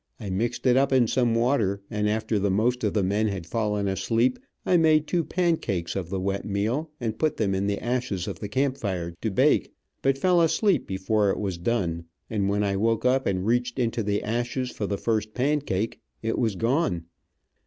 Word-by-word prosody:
I 105 -5 -5
mixed 115 +8 -2
it 125 -1 +5
up 135 +1 +3
in 130 -2 +5
some 120 0 +1
water, 115 -5 +1
and 105 -1 0
after 110 0 0
the 100 +1 +1
most 120 +6 +1
of - - 0
the 105 - +2
men 105 +4 +1
had 95 -5 -3
fallen 105 +1 -1
asleep, 115 +6 +1 0.3
I 180 - +3
made 155 -2 +4
two 170 +1 0
pancakes 160 - -1
of 90 -3 -3
the 95 0 -2
wet 100 +1 -2
meal, 110 +10 -1
and 110 -3 -3
put 155 -1 +1
them 100 -3 +1
in 95 +1 0
the 100 0 0
ashes 120 -7 -2
of - - -5
the 105 - -5
camp 135 +3 0
fire 90 -5 -3
to 110 - 0
bake, 95 - +2 0.3
but 135 0 +2
fell 180 +3 +3
asleep 190 +4 +2
before 100 +2 +1
it - - 0
was 95 -4 -3
done, 85 -5 -1 0.3
and 100 -3 0
when 100 +1 +1
I 100 -1 0
woke 115 +3 +1
up 130 +1 +2
and 95 -1 0
reached 120 +2 0
into 120 -2 0
the 105 -1 -1
ashes 120 +3 -2
for 105 - -3
the 100 - -1
first 110 -1 -1
pancake, 130 -6 0 0.2
it 115 0 -1
was 110 -4 +1
gone. 115 - 0
110 Hz, 205 wpm, -26 LUFS, 100-125 Hz, 0.3 s, it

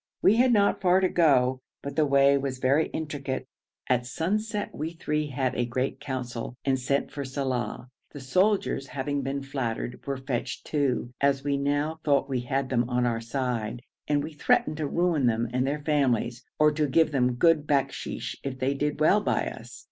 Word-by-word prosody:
We 215 - +5
had 250 +1 +5
not 205 -3 +3
far 185 0 +4
to 190 - +3
go, 130 -6 +3 0.2
but 140 0 -5
the 155 -1 +3
way 140 0 +5
was 135 -2 -2
very 135 +5 +2
intricate. 145 -4 -4 0.4
At 125 -1 +1
sunset 210 - -2
we 160 +3 -4
three 150 -2 -2
had 130 -2 -1
a 125 - 0
great 130 +2 -2
council, 125 -3 -5
and 135 -1 +2
sent 140 +2 -1
for 140 - -4
Saleh; 130 -4 -3 0.3
the 145 - -8
soldiers, 185 +1 +1
having 140 +1 -2
been 135 +1 -3
flattered, 125 -3 -4
were 140 -1 -1
fetched 130 -2 -4
too, 135 -5 0
as 140 -1 +2
we 140 0 0
now 145 +3 -1
thought 140 -3 +2
we 130 -2 -1
had 130 +2 -2
them 120 -1 +1
on 125 0 +1
our 115 -1 0
side, 120 -2 -3 0.2
and 145 -1 +1
we 155 +1 -6
threatened 150 +1 +1
to 155 -2 -1
ruin 170 -5 +1
them 115 0 +1
and 130 +1 +1
their 145 +1 -2
families, 125 -5 +1
or 150 0 +5
to 150 0 0
give 155 +3 +3
them 125 -3 +1
good 155 +2 +3
bakshish 140 -2 -1
if 135 -1 -4
they 130 +2 0
did 150 +1 -2
well 190 +7 +4
by - - 0
us. - - -11
140 Hz, 190 wpm, -27 LUFS, 130-150 Hz, 0.4 s, We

